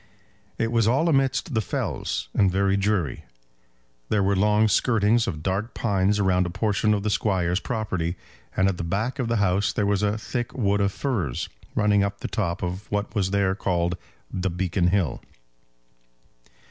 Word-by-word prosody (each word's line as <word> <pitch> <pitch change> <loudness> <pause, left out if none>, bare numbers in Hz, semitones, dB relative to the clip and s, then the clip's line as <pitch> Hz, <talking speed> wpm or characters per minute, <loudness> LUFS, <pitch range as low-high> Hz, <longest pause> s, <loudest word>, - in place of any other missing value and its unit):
It 115 0 0
was 115 -2 +3
all 135 +8 +3
amidst 135 -2 +1
the 110 - +2
fells, 90 - -3
and 100 - +3
very 95 +1 +2
dreary. 100 - 0 0.9
There 105 -2 +2
were 100 +1 +2
long 105 +2 +3
skirtings 115 +1 +2
of 75 -5 -4
dark 100 +6 -2
pines 100 -2 +1
around 90 -3 +2
a - - -4
portion 105 +3 +1
of 100 - -3
the 105 - 0
Squire's 90 -4 +1
property, 95 -9 -2 0.4
and 95 - +4
at 95 -2 0
the - - -3
back 105 - -2
of 125 - 0
the 115 - 0
house 100 -1 +2
there 105 - 0
was 100 -1 +1
a 105 +1 +1
thick 120 +2 -4
wood 100 -4 +2
of 100 0 +2
firs 95 - -2 0.3
running 105 -1 +3
up 100 0 -1
to - - -34
the - - -2
top 90 -4 -1
of 90 +3 -4
what 105 0 -2
was 100 -4 0
there 100 -1 +2
called 90 -3 0 0.4
the 95 0 -1
Beacon 90 0 0
Hill. 95 -2 0
100 Hz, 180 wpm, -25 LUFS, 95-110 Hz, 0.9 s, and